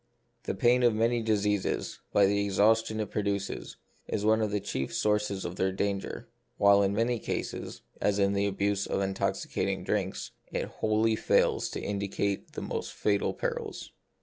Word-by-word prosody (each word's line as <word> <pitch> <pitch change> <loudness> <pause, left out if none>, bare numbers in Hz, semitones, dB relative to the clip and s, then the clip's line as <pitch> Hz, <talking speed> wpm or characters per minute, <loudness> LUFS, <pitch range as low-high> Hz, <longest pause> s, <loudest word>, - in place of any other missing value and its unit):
The - - -2
pain 120 +5 +4
of 120 -3 +4
many 115 +2 +2
diseases, 105 -2 0
by 100 - +5
the 100 +1 +2
exhaustion 110 +2 +2
it 105 -2 -3
produces, 100 -1 -2 0.3
is 105 - -2
one 110 +1 +4
of 110 - +1
the 105 0 0
chief 70 -8 -3
sources 105 -2 0
of 90 +1 -5
their 95 0 +1
danger; 100 +1 -3 0.3
while 100 0 +6
in 100 0 +1
many 115 +2 +1
cases, - - -4 0.2
as 100 -1 +2
in 100 0 +3
the 100 0 +1
abuse 100 0 0
of - - -1
intoxicating 95 0 -1
drinks, - - -2 0.2
it - - -1
wholly 110 +1 +1
fails - - +2
to - - -4
indi 100 -1 -2
cate 100 0 -2
the - - -5
most - - -4
fatal 100 -1 +1
perils. - - -4
100 Hz, 170 wpm, -29 LUFS, 100-110 Hz, 0.3 s, while